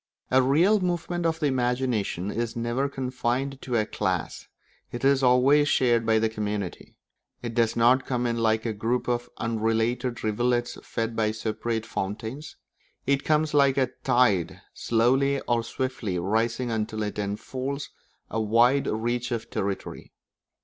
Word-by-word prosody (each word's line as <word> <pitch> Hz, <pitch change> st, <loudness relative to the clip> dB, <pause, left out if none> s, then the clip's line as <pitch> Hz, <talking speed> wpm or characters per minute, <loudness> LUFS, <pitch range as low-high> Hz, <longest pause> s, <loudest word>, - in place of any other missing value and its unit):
A 130 Hz, +1 st, +5 dB
real 165 Hz, +11 st, +4 dB
movement 175 Hz, -1 st, -1 dB
of 160 Hz, 0 st, -1 dB
the 150 Hz, -, 0 dB
imagination 125 Hz, -7 st, 0 dB
is 115 Hz, 0 st, -3 dB
never 120 Hz, +4 st, -1 dB
confined 130 Hz, 0 st, -2 dB
to 125 Hz, -, -3 dB
a 110 Hz, -2 st, +2 dB
class; 95 Hz, -5 st, -3 dB, 0.4 s
it 120 Hz, +2 st, -4 dB
is 140 Hz, 0 st, +4 dB
always 135 Hz, +4 st, +5 dB
shared 120 Hz, -3 st, +2 dB
by 110 Hz, 0 st, +4 dB
the 110 Hz, 0 st, +2 dB
community. 105 Hz, -3 st, -4 dB, 0.5 s
It 120 Hz, -1 st, -4 dB
does 115 Hz, -1 st, +2 dB
not 125 Hz, +3 st, +4 dB
come 125 Hz, -2 st, -1 dB
in 115 Hz, -1 st, 0 dB
like 110 Hz, 0 st, +1 dB
a 115 Hz, -, -1 dB
group 115 Hz, +4 st, -1 dB
of 120 Hz, 0 st, -1 dB
unrelated 115 Hz, +2 st, -1 dB
rivulets 120 Hz, +3 st, 0 dB
fed 115 Hz, 0 st, -3 dB
by 110 Hz, -1 st, +1 dB
separate 110 Hz, +1 st, -3 dB
fountains; 115 Hz, +10 st, -5 dB, 0.5 s
it 140 Hz, 0 st, +1 dB
comes 155 Hz, 0 st, +1 dB
like 140 Hz, -2 st, +4 dB
a 130 Hz, -2 st, +2 dB
tide, 120 Hz, -9 st, +2 dB
slowly 135 Hz, +4 st, +2 dB
or 120 Hz, -1 st, 0 dB
swiftly 115 Hz, -6 st, -3 dB
rising 115 Hz, +6 st, 0 dB
until 110 Hz, -1 st, -2 dB
it 105 Hz, 0 st, -4 dB
enfolds 130 Hz, +7 st, -4 dB, 0.4 s
a 110 Hz, -, -2 dB
wide 120 Hz, +6 st, +3 dB
reach 120 Hz, +3 st, -1 dB
of 115 Hz, -2 st, -4 dB
territory. 100 Hz, 0 st, -4 dB
120 Hz, 150 wpm, -26 LUFS, 110-130 Hz, 0.5 s, A